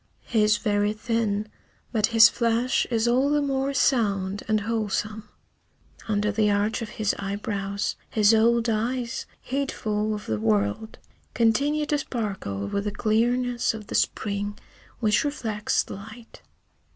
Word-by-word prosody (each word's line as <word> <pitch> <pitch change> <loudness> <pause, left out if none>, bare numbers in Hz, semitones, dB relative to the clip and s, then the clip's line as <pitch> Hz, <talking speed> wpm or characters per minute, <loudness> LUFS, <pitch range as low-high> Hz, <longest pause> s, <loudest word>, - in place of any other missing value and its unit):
He 225 - +1
is 210 0 +4
very 205 -1 +1
thin, 215 -2 -1 0.4
but 215 -3 +2
his 225 -1 +8
flesh 235 +2 +1
is 230 -1 +1
all 255 +4 +3
the 295 0 +2
more 275 -1 0
sound 205 -8 +1
and 215 -1 +2
wholesome. 215 0 -2 0.8
Under 210 -1 +1
the 210 0 +2
arch 205 +2 +1
of 225 - -5
his 215 -2 +1
eyebrows 200 0 -3
his 215 0 +4
old 230 +1 +3
eyes, 235 +2 -2
heedful 215 -6 -2
of 210 - -8
the 110 -1 -2
world, 105 - 0 0.4
continue 280 +7 +2
to 295 0 0
sparkle 195 - -4
with 200 - -2
the 210 - -1
clearness 240 +3 +1
of 215 -1 -8
the - - -8
spring 205 0 -1 0.4
which 215 -2 +3
reflects 225 -8 -1
the - - -9
light. 220 +4 -11
220 Hz, 140 wpm, -25 LUFS, 205-235 Hz, 0.8 s, his